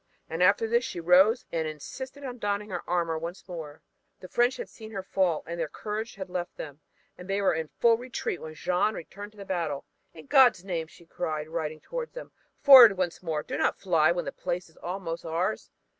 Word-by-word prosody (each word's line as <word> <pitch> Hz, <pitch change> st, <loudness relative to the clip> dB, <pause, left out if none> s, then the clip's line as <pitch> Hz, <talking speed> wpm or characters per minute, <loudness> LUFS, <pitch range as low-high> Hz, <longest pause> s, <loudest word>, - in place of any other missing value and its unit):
And 165 Hz, +2 st, -4 dB
after 200 Hz, +4 st, +4 dB
this 235 Hz, +2 st, +2 dB
she 175 Hz, -, -5 dB
rose 185 Hz, +7 st, +5 dB
and 160 Hz, -1 st, -1 dB
insisted 260 Hz, -, -8 dB
on 250 Hz, -2 st, -6 dB
donning 205 Hz, 0 st, -2 dB
her 180 Hz, -, -3 dB
armor 170 Hz, -2 st, 0 dB
once 170 Hz, +4 st, -7 dB
more. 160 Hz, -4 st, -8 dB, 0.4 s
The 185 Hz, -, -10 dB
French 245 Hz, +6 st, +2 dB
had -, -, -5 dB
seen 220 Hz, -1 st, -11 dB
her 195 Hz, -3 st, -5 dB
fall 185 Hz, -4 st, 0 dB
and 170 Hz, +1 st, -5 dB
their 165 Hz, -, 0 dB
courage 215 Hz, +8 st, -5 dB
had 190 Hz, -2 st, -6 dB
left 180 Hz, -1 st, -5 dB
them, 145 Hz, -1 st, -8 dB, 0.4 s
and 180 Hz, +1 st, -10 dB
they 195 Hz, +1 st, +1 dB
were 200 Hz, -, +3 dB
in 160 Hz, 0 st, -2 dB
full 230 Hz, -1 st, +5 dB
retreat 245 Hz, -7 st, -4 dB
when 155 Hz, 0 st, -8 dB
Jeanne 180 Hz, +6 st, +1 dB
returned 205 Hz, +5 st, -9 dB
to -, -, -22 dB
the 200 Hz, -, -8 dB
battle. 165 Hz, -7 st, -2 dB, 0.3 s
"In 155 Hz, -, -11 dB
God's 240 Hz, -, +5 dB
name," 170 Hz, -4 st, -2 dB
she 170 Hz, -, -18 dB
cried, 155 Hz, -1 st, -4 dB
riding 155 Hz, -1 st, -4 dB
toward -, -, -5 dB
them, -, -, -8 dB, 0.3 s
"forward 245 Hz, -8 st, +10 dB
once 180 Hz, -2 st, -2 dB
more. 160 Hz, -4 st, -2 dB
Do -, -, -4 dB
not -, -, +1 dB
fly 165 Hz, -5 st, +3 dB
when 175 Hz, 0 st, -2 dB
the -, -, -3 dB
place 175 Hz, 0 st, -4 dB
is 160 Hz, -, -25 dB
almost 175 Hz, -2 st, -5 dB
ours. 170 Hz, +6 st, -2 dB
180 Hz, 215 wpm, -28 LUFS, 165-210 Hz, 0.4 s, forward